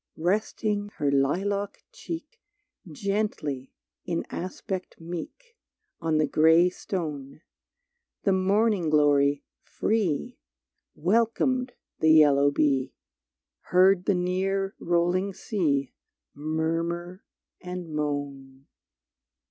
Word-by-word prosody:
Resting 205 +3 -1
her 145 -1 0
lilac 195 +9 0
cheek 330 +6 -8 0.5
Gently, 155 -8 -2 0.3
in 170 -2 -2
aspect 185 +1 -5
meek, 290 - -8 0.4
On 160 -1 0
the 155 - +3
gray 160 +4 +4
stone, 155 -7 -5 0.8
The 200 - +3
morning 195 -1 +2
glory, 145 -1 +3 0.2
free, 205 -9 -1 0.6
Welcomed 235 - +1 0.3
the 160 - +3
yellow 145 -2 +6
bee, 140 -2 +1 0.7
Heard 185 0 +4
the 200 - +2
near 190 +2 -1
rolling 175 +3 +1
sea 145 - -1 0.4
Murmur 165 +4 -2 0.4
and 180 -1 -6
moan. 140 -2 -4
175 Hz, 85 wpm, -26 LUFS, 150-195 Hz, 0.8 s, yellow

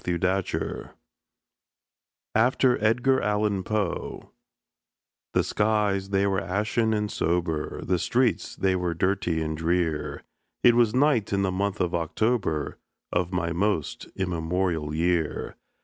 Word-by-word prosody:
THE 90 -1 0
WILLOWS 95 +1 -2 1.4
(AFTER 125 0 +3
EDGAR 125 +4 +3
ALLAN 105 -2 0
POE) 105 -3 -3 1.0
The - - +4
skies 105 -2 +1
they 100 0 +2
were 95 0 +1
ashen 105 +4 0
and 105 -1 -1
sober, 85 -2 -1
The 90 -1 0
streets 120 +7 +1
they 95 -1 +1
were 90 -2 -1
dirty 90 -2 0
and 80 0 -2
drear; 80 -1 -1 0.4
It 120 - +7
was 120 -2 +3
night 130 -6 +3
in 100 -1 +1
the 95 - +1
month 100 +1 -1
of 90 -1 0
October, 85 - -1 0.3
Of 90 0 0
my 85 -2 -1
most 90 -4 -1
immemorial 85 -3 -1
year. 85 -1 0
95 Hz, 125 wpm, -26 LUFS, 85-105 Hz, 1.4 s, It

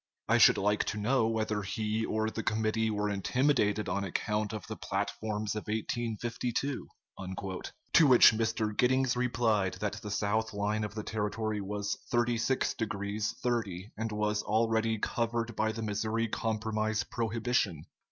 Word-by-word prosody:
I - - +4
should - - +7
like 105 +1 +2
to 105 - -2
know 115 +2 +2
whether 110 -2 -1
he 110 +2 -2
or 110 0 0
the 115 - -3
committee 110 0 0
were 105 -1 0
intimidated 105 0 +1
on 100 +2 -1
account 105 +3 -1
of 105 -4 -6
the - - -6
platforms 110 -1 -2
of 105 - -5
1852?" 120 +4 -2 0.3
To 95 - 0
which 125 -2 +8
Mr. 110 -1 -1
Giddings 130 +1 +3
replied 115 -6 +1
that 105 +1 -3
the 105 - -6
south 105 +2 0
line 105 +1 0
of 105 -1 -5
the 105 - -3
territory 110 0 -2
was 100 +1 -3
36 120 +2 +1
degrees 105 -1 -2
30', 105 -5 -2
and 110 +1 -3
was 105 0 0
already 110 0 +1
covered 115 +1 -1
by 110 0 +1
the 110 0 -5
Missouri 110 +2 -1
Compromise 110 -1 -1
prohibition. 115 - -1
110 Hz, 145 wpm, -31 LUFS, 105-115 Hz, 0.3 s, which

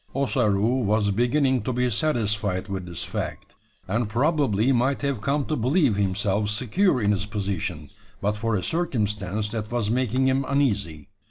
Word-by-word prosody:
Ossaroo 125 -3 +1
was 105 0 +2
beginning 125 +4 +2
to 120 - -2
be 125 0 +1
satisfied 105 -7 0
with 95 -2 -5
this 85 - -4
fact; - - -5 0.3
and 105 +3 -1
probably 130 -2 +2
might 135 +3 +1
have 140 -6 -1
come 140 +5 0
to 155 - -1
believe 130 - +2
himself 100 +1 0
secure 125 - +1
in 105 -2 +2
his 100 0 -1
position, 100 -3 -4 0.3
but 105 +1 0
for 115 +1 -1
a 95 - -1
circumstance 105 - -1
that 110 -2 -4
was 115 -3 0
making 130 +1 +1
him 130 +1 +2
uneasy. 100 - 0
110 Hz, 160 wpm, -24 LUFS, 100-130 Hz, 0.3 s, was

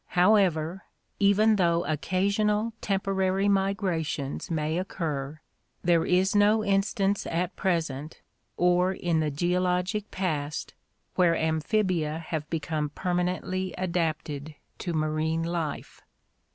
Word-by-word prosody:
However, 180 -3 +3 0.3
even 210 +2 +4
though 170 -2 +2
occasional 200 +7 0
temporary 195 0 0
migrations 190 -8 -1
may 160 0 -1
occur, 155 -6 -4 0.4
there 170 -2 +3
is 185 +2 +2
no 210 +1 +4
instance 195 0 +1
at 175 +2 -2
present 160 -5 -2 0.4
or 180 +1 +3
in 170 -3 0
the 155 -1 +1
geologic 180 +5 0
past 155 -6 -3 0.4
where 175 -2 +3
amphibia 160 0 0
have 160 -2 -5
be 165 - -1
come 150 0 -2
permanently 180 +2 -2
adapted 155 -4 -2 0.2
to 175 - -3
marine 155 +1 0
life. 165 -3 -4
175 Hz, 105 wpm, -27 LUFS, 160-195 Hz, 0.4 s, even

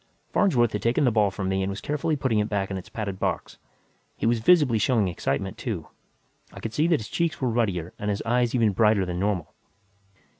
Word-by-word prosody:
Farnsworth 120 - +3
had 105 - -3
taken 120 +4 +2
the 125 - +4
ball 105 -2 +3
from 95 0 -4
me 95 0 0
and 95 - -1
was 100 0 -4
carefully 150 +2 -1
putting 130 -6 0
it 105 - 0
back 100 -2 -1
in 95 - -2
its 90 - -12
padded 100 -4 -4
box. - - -3 0.6
He - - -2
was 115 0 +2
visibly 135 -4 +4
showing 110 -2 +2
excitement, 90 +1 -3
too; 95 - -4 0.6
I - - -11
could 115 - -5
see 155 +2 +2
that 165 -7 +2
his 110 - -7
cheeks 170 -2 -1
were 130 - 0
ruddier 100 -8 -1
and 105 - -2
his 100 0 -2
eyes 120 +1 +1
even 115 -4 +3
brighter 105 0 +3
than 90 -1 -4
normal. 90 -7 -1
110 Hz, 220 wpm, -25 LUFS, 95-120 Hz, 0.6 s, the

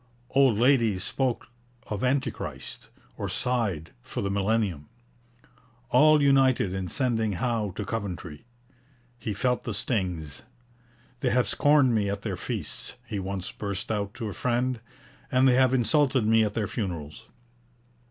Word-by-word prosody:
Old 135 -5 +4
ladies 115 -6 +3
spoke 130 0 -1 0.4
of 105 +1 -4
Antichrist, 130 +1 -2 0.3
or - - -3
sighed 105 -11 -1
for - - -5
the 100 - -1
millennium. 100 -6 0 1.0
All 155 0 +6
united 135 -8 +4
in 95 -1 -3
sending 115 -3 0
Howe 115 -1 -1
to 105 - -4
Coventry. 95 -8 -5 0.8
He 110 -2 -3
felt 125 +4 0
the - - -3
stings. 90 - -2 0.8
'They - - +1
have 125 0 +2
scorned 145 -4 +4
me 105 -3 +1
at 100 0 -4
their - - -2
feasts,' - - -5
he 110 -4 -4
once 95 -1 -4
burst 100 0 -4
out 100 -1 -2
to 115 - -4
a 100 - -5
friend, 125 +2 0 0.5
'and 130 +1 +4
they 130 - +5
have 130 0 +4
insulted 130 0 +3
me 110 +1 +4
at 105 -1 -2
their 105 -3 0
funerals!' 90 0 -5
110 Hz, 140 wpm, -27 LUFS, 100-125 Hz, 1.0 s, All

